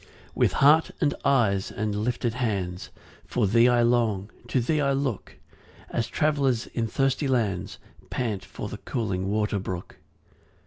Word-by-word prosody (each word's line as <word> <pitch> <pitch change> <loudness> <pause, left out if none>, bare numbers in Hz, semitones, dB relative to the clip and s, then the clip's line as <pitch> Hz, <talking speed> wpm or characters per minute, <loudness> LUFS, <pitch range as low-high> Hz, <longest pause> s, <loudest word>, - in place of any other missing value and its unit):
3 - - -23 0.3
With - - +2
heart, 150 +4 +5
and 145 -3 +2
eyes 110 -9 +2
and 105 0 -2
lifted 120 +2 -1
hands, 100 -7 -2 0.4
For 120 - +1
thee 115 +5 +5
I 120 -1 +4
long, 115 -4 +1 0.2
to 130 - +1
thee 150 +6 +1
I 140 -1 +2
look, 135 -6 -3 0.6
As 115 - -1
travellers 140 -6 +1
in 115 -1 -2
thirsty 135 +4 0
lands 110 -9 -1 0.3
Pant 110 -6 -2
for - - -7
the - - -7
cooling 95 -6 -2
water 105 -1 0
brook. 95 -2 -6
115 Hz, 150 wpm, -26 LUFS, 105-135 Hz, 0.6 s, heart